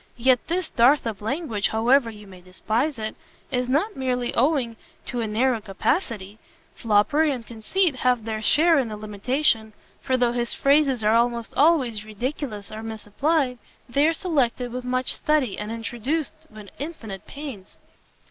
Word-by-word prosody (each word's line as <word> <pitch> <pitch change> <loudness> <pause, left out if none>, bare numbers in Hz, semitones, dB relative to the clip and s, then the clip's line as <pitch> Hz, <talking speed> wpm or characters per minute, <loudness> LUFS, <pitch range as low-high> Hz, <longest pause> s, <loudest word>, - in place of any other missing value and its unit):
Yet 250 +1 +3
this 350 0 -1
dearth 255 +5 +4
of 220 -4 -4
language, 225 - -1
however 235 +3 +3
you 210 -2 -11
may 185 -2 -13
despise 220 - -2
it, 215 0 -4 0.4
is 250 -1 -1
not 320 +11 +1
merely 250 -2 -1
owing 255 -3 +1 0.3
to 245 -2 -3
a 225 - -1
narrow 230 +2 +1
capacity: 210 - -2 0.3
foppery 235 +9 +2
and 245 -4 -4
conceit 270 - 0
have 250 -3 +1
their 220 -1 -3
share 320 +7 +4
in 260 - 0
the 215 -1 -6
limitation, 220 +2 0 0.3
for 260 - +1
though 245 -1 +2
his 240 0 -1
phrases 275 -4 +3
are 215 +1 +4
almost 235 0 +1
always 265 -9 +3
ridiculous 215 -1 -5
or 215 0 -6
misapplied, 250 +5 -1 0.3
they 280 +5 +3
are 325 - +3
selected 265 -8 0
with 250 0 -4
much 255 +1 0
study, 295 -9 +1
and 210 +1 -4
introduced 280 +8 -3
with 215 -2 -12
infinite 245 - -7
pains." 275 -10 -9
245 Hz, 155 wpm, -24 LUFS, 220-285 Hz, 0.4 s, dearth